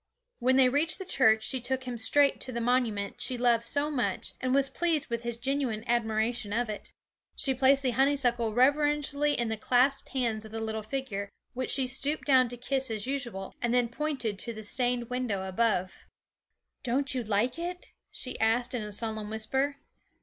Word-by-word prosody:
When 255 Hz, +1 st, +3 dB
they 265 Hz, -1 st, +6 dB
reached 290 Hz, +5 st, +2 dB
the 380 Hz, -, -7 dB
church, 220 Hz, -10 st, +3 dB
she 260 Hz, -2 st, 0 dB
took 260 Hz, +1 st, -1 dB
him 250 Hz, -1 st, -5 dB
straight 280 Hz, +5 st, +3 dB
to 260 Hz, -, -3 dB
the 235 Hz, -, -3 dB
monument 230 Hz, -4 st, 0 dB
she 255 Hz, -, 0 dB
loved 235 Hz, -1 st, +3 dB
so 290 Hz, +5 st, +1 dB
much, 255 Hz, -5 st, -2 dB
and 255 Hz, -, 0 dB
was 275 Hz, +1 st, +4 dB
pleased 315 Hz, -3 st, -1 dB
with 235 Hz, 0 st, -1 dB
his 235 Hz, -1 st, -4 dB
genuine 255 Hz, -3 st, -1 dB
admiration 225 Hz, -1 st, 0 dB
of 240 Hz, 0 st, 0 dB
it. 210 Hz, -, -7 dB, 0.4 s
She 270 Hz, -3 st, +1 dB
placed 270 Hz, +2 st, +3 dB
the 255 Hz, -, +1 dB
honeysuckle 245 Hz, -3 st, +2 dB
reverentially 290 Hz, +3 st, +2 dB
in 235 Hz, -2 st, -1 dB
the 220 Hz, -, -2 dB
clasped 255 Hz, +5 st, +2 dB
hands 235 Hz, -5 st, -1 dB
of 220 Hz, -, -11 dB
the 225 Hz, -, -4 dB
little 220 Hz, 0 st, -3 dB
figure, 215 Hz, -4 st, -4 dB, 0.2 s
which 255 Hz, 0 st, -3 dB
she 265 Hz, -1 st, +3 dB
stooped 275 Hz, +4 st, +1 dB
down 260 Hz, -3 st, +4 dB
to 245 Hz, -, -5 dB
kiss 265 Hz, +1 st, -1 dB
as 215 Hz, -2 st, -2 dB
usual, 240 Hz, -8 st, -4 dB
and 240 Hz, +1 st, +1 dB
then 245 Hz, -1 st, +2 dB
pointed 245 Hz, -7 st, -2 dB
to 235 Hz, -, -4 dB
the 220 Hz, -, -8 dB
stained 245 Hz, +2 st, -1 dB
window 220 Hz, -7 st, -2 dB
above. 190 Hz, -2 st, -1 dB, 0.7 s
'Don't 265 Hz, +2 st, +2 dB
you 255 Hz, -2 st, -1 dB
like 220 Hz, +7 st, 0 dB
it?' 355 Hz, +1 st, -6 dB, 0.2 s
she 255 Hz, -, -5 dB
said 230 Hz, +3 st, +2 dB
in 245 Hz, -, -1 dB
a 210 Hz, 0 st, -6 dB
solemn 220 Hz, 0 st, -4 dB
whisper. 265 Hz, +6 st, -1 dB
245 Hz, 190 wpm, -29 LUFS, 225-270 Hz, 0.7 s, they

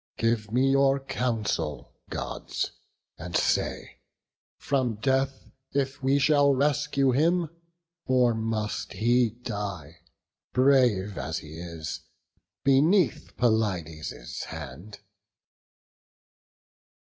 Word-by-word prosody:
Give 115 Hz, -2 st, 0 dB
me 130 Hz, +3 st, +3 dB
your 135 Hz, 0 st, +4 dB
counsel, 105 Hz, -, -2 dB, 0.2 s
Gods, -, -, -4 dB, 0.5 s
and 85 Hz, +1 st, -2 dB
say, -, -, -1 dB, 0.6 s
from 130 Hz, -5 st, 0 dB
death 135 Hz, +4 st, -1 dB, 0.2 s
If 135 Hz, 0 st, -1 dB
we 135 Hz, +1 st, +3 dB
shall 140 Hz, -1 st, +4 dB
rescue 140 Hz, -1 st, +2 dB
him, 165 Hz, +5 st, +2 dB, 0.6 s
or 125 Hz, -2 st, +4 dB
must 110 Hz, -1 st, -2 dB
he 120 Hz, +1 st, +3 dB
die, 100 Hz, -, -6 dB, 0.6 s
Brave 125 Hz, -, +3 dB
as -, -, -3 dB
he 80 Hz, +2 st, -8 dB
is, 80 Hz, -1 st, -6 dB, 0.6 s
beneath 140 Hz, -, +3 dB
Pelides' 85 Hz, -, -1 dB
hand?" 80 Hz, +8 st, -9 dB
120 Hz, 85 wpm, -27 LUFS, 95-135 Hz, 0.6 s, your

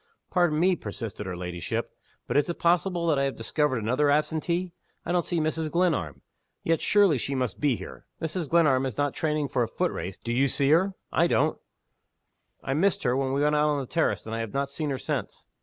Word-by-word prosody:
"Pardon 175 Hz, -4 st, +2 dB
me," 185 Hz, +2 st, +4 dB
persisted 105 Hz, -, -6 dB
her 90 Hz, -1 st, -4 dB
ladyship 90 Hz, -2 st, -4 dB, 0.3 s
"but -, -, -3 dB
is 145 Hz, +2 st, +3 dB
it 170 Hz, -, -3 dB
possible 175 Hz, 0 st, +1 dB
that 155 Hz, -4 st, +2 dB
I 140 Hz, -, +2 dB
have 135 Hz, -, -2 dB
discovered 140 Hz, +3 st, 0 dB
another 125 Hz, +7 st, +1 dB
absentee? 165 Hz, +4 st, 0 dB, 0.3 s
I -, -, -2 dB
don't 175 Hz, -1 st, +2 dB
see 175 Hz, -, -1 dB
Mrs. 155 Hz, 0 st, -1 dB
Glenarm. 155 Hz, -, 0 dB, 0.4 s
Yet 165 Hz, 0 st, +1 dB
surely 200 Hz, -10 st, +4 dB
she 135 Hz, +4 st, -3 dB
must 125 Hz, -6 st, -2 dB
be 145 Hz, -4 st, +2 dB
here! -, -, -10 dB
Mrs. 160 Hz, -1 st, -3 dB
Glenarm 140 Hz, -6 st, +4 dB
is 125 Hz, -, -6 dB
not 145 Hz, -1 st, 0 dB
training 150 Hz, -2 st, -1 dB
for 125 Hz, -, 0 dB
a 115 Hz, -, +1 dB
foot 180 Hz, +9 st, -1 dB
race. 95 Hz, 0 st, -5 dB
Do 115 Hz, -, -5 dB
you 130 Hz, +4 st, +3 dB
see 140 Hz, +1 st, +1 dB
her? 190 Hz, +4 st, +3 dB, 0.2 s
I -, -, +3 dB
don't." -, -, +1 dB, 1.0 s
"I 135 Hz, -, -1 dB
missed 180 Hz, +5 st, +1 dB
her 125 Hz, -2 st, +2 dB
when 135 Hz, 0 st, 0 dB
we 140 Hz, +2 st, +1 dB
went 150 Hz, 0 st, +3 dB
out 150 Hz, 0 st, +3 dB
on 145 Hz, -1 st, +1 dB
the 135 Hz, -, -4 dB
terrace, 165 Hz, +5 st, 0 dB
and 110 Hz, -, -6 dB
I 115 Hz, -, -2 dB
have 115 Hz, +2 st, -5 dB
not 140 Hz, 0 st, -1 dB
seen 150 Hz, +1 st, -3 dB
her 135 Hz, -, -1 dB
since." -, -, -4 dB
145 Hz, 225 wpm, -27 LUFS, 130-170 Hz, 1.0 s, me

